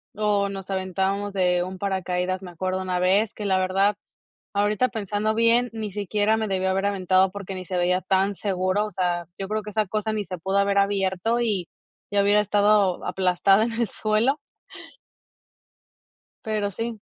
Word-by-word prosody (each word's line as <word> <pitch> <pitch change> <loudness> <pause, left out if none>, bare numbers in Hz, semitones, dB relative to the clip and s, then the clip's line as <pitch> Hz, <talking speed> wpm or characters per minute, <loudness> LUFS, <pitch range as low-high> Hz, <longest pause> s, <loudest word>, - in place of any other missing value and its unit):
o 205 -1 +1
nos 195 -1 -7
aventábamos 195 +2 -1
de 180 -2 +2
un 185 +1 -6
paracaídas, 185 -1 -2
me 180 -2 -9
acuerdo 185 +2 -2
una 185 -1 -1
vez, 195 +4 +2
que 210 - -6
la 190 -1 +2
verdad, 195 +2 +2 0.6
ahorita 205 +4 +1
pensando 215 0 -1
bien, 230 +2 +3
ni 220 -2 -4
siquiera 210 +2 0
me 220 -1 -1
debí 190 -1 -1
haber 190 +1 +1
aventado 190 -1 +2
porque 195 -1 -7
ni 185 0 -6
se 180 0 -3
veía 180 +1 +2
tan 195 +2 +1
seguro, 190 +1 0
o 210 - -7
sea, 175 -2 -1
yo 195 - -3
creo 215 +1 -2
que 210 - -7
esa 215 0 0
cosa 215 +2 -2
ni 210 -1 -2
se 185 0 -6
pudo 190 +4 -1
haber 200 0 +2
abierto 200 +3 +1
y 205 -7 -1 0.4
ya 200 0 +3
hubiera 205 +1 +4
estado 205 -2 +2
aplastada 190 +2 +3
en 230 - -1
el 230 -2 -1
suelo. 220 +9 +1 2.0
Pero 215 -3 -1
sí. 225 +2 -4
200 Hz, 175 wpm, -24 LUFS, 185-210 Hz, 2.0 s, hubiera